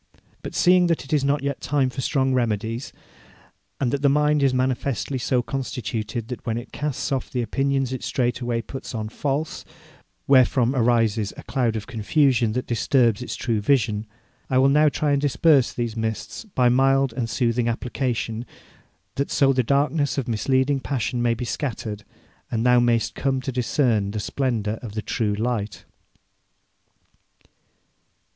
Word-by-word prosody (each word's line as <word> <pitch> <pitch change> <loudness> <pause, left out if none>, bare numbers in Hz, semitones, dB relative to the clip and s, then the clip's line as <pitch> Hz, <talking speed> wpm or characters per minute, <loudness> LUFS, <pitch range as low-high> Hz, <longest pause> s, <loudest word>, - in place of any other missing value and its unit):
But - - -7
seeing 180 0 +5
that 165 -4 0
it 135 - -6
is 145 -3 +2
not 140 0 +1
yet 140 -1 -3
time 135 -2 +1
for 135 - -4
strong 130 0 +1
remedies, 115 0 -1 0.9
and 125 -4 0
that 140 - -1
the 140 - +4
mind 150 +1 +3
is 135 -1 +4
manifestly 130 +1 -1
so 125 +1 +1
constituted 115 -3 -4
that 125 - -6
when 115 -1 -2
it 120 +1 -7
casts 145 -1 -3
off 135 -2 -1
true 125 -2 -2
opinions 135 +1 0
it 130 - -5
straightway 120 -2 -1
puts 130 +2 -7
on 110 -1 -3
false, 145 +5 -3 0.6
wherefrom 130 -2 +4
arises 115 -4 +2
a - - -9
cloud 120 -5 0
of 110 - -4
confusion 120 0 +1
that 125 +2 -2
disturbs 120 -1 +2
its 125 - -4
true 115 -4 -1
vision, 110 -3 +1 0.4
I 130 - +2
will 135 +1 +5
now 150 +2 +5
try 145 0 -1
and 140 -1 +2
disperse 145 -2 +3
these 120 -2 -3
mists 110 - -4
by 130 - +1
mild 135 +1 +3
and 115 -1 -3
soothing 120 -1 0
application, 120 -1 -3 0.7
that 140 - -1
so 135 -1 +3
the 130 - +2
darkness 140 +4 +1
of 135 -3 -2
misleading 130 +4 +1
passion 125 -3 -2
may 120 -1 +2
be 120 - -4
scattered, 110 -6 -4 0.5
and 115 0 -1
thou 125 0 +5
mayst 120 -1 +1
come 135 -1 -1
to 135 - -4
discern 120 -4 +1
the 105 +1 -3
splendour 110 -2 -2
of 115 -4 -7
the 110 -1 -4
true 105 -3 -1
light.' 110 -2 -3
125 Hz, 165 wpm, -23 LUFS, 115-135 Hz, 0.9 s, seeing